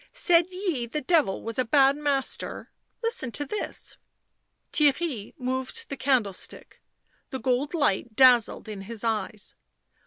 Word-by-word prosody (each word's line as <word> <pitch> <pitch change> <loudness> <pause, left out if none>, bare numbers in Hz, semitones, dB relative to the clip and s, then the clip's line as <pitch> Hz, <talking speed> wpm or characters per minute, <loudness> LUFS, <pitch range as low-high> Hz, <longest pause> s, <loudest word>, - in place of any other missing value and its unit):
Said 340 -1 +4
ye 365 -10 -2
the 300 - -3
Devil 310 - +2
was 230 +2 -4
a - - +4
bad 270 +3 +4
master? 285 -2 -2
— - - -43
listen 455 - -1
to 290 - -2
this." 420 +9 -5 0.8
Theirry 290 -6 +1
moved 260 - -4
the 280 - -3
candlestick; 240 -7 -2 0.5
the 265 - -4
gold 265 +5 0
light 235 - 0
dazzled 245 -4 +5
in 210 -2 -6
his 220 +2 -7
eyes 215 -2 -2
260 Hz, 135 wpm, -26 LUFS, 230-300 Hz, 0.8 s, dazzled